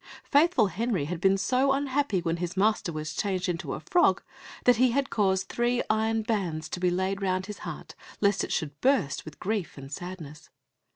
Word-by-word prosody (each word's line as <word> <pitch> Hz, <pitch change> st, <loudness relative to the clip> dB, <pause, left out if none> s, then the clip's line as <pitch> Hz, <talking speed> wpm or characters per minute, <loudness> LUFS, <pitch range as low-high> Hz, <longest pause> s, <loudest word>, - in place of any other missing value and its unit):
Faithful 290 Hz, -5 st, +4 dB
Henry 200 Hz, -3 st, -1 dB
had 170 Hz, +2 st, -4 dB
been 195 Hz, +1 st, +4 dB
so 260 Hz, +7 st, +2 dB
unhappy 275 Hz, -7 st, 0 dB
when 170 Hz, 0 st, -1 dB
his 175 Hz, +1 st, -4 dB
master 210 Hz, -3 st, +2 dB
was 155 Hz, -1 st, -5 dB
changed 190 Hz, -2 st, -1 dB
into 170 Hz, -2 st, -3 dB
a -, -, -6 dB
frog, 355 Hz, -1 st, +3 dB, 0.4 s
that 245 Hz, -2 st, +5 dB
he 255 Hz, +1 st, +4 dB
had 275 Hz, +3 st, 0 dB
caused 190 Hz, -3 st, +1 dB
three 240 Hz, +1 st, 0 dB
iron 220 Hz, +1 st, +1 dB
bands 190 Hz, -9 st, -2 dB
to -, -, -4 dB
be 180 Hz, 0 st, +2 dB
laid 190 Hz, +2 st, -1 dB
round 185 Hz, -1 st, 0 dB
his 210 Hz, 0 st, -8 dB
heart, -, -, -7 dB, 0.3 s
lest 200 Hz, -1 st, +2 dB
it -, -, -4 dB
should 145 Hz, -2 st, -3 dB
burst 255 Hz, -, +1 dB
with 155 Hz, -, -11 dB
grief 205 Hz, -5 st, -2 dB
and 135 Hz, 0 st, -9 dB
sadness. 165 Hz, -3 st, -8 dB
195 Hz, 190 wpm, -27 LUFS, 175-235 Hz, 0.4 s, that